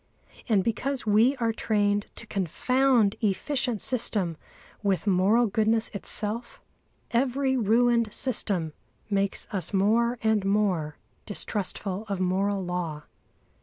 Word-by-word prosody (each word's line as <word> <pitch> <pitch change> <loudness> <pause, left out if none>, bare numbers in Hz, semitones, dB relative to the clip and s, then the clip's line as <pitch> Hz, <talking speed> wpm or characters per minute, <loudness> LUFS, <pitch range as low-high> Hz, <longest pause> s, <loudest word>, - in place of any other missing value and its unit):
And 205 -4 +3
because 255 +5 -2
we 220 +6 +4
are 230 -3 -1
trained 205 -2 0
to - - -7
confound 225 - +1
efficient 230 +2 0
system 205 -8 0 0.5
with 200 -2 0
moral 200 +5 +3
goodness 220 +1 +2
itself, 215 +3 -3 0.5
every 265 +2 +1
ruined 235 0 +2
system 195 - 0 0.4
makes 200 -1 0
us 195 0 -2
more 230 +5 +2
and 220 -2 +2
more 195 -7 0 0.3
distrustful 205 -1 -3
of 200 -2 -3
moral 190 +1 0
law. 170 -4 -4
210 Hz, 110 wpm, -26 LUFS, 195-235 Hz, 0.5 s, we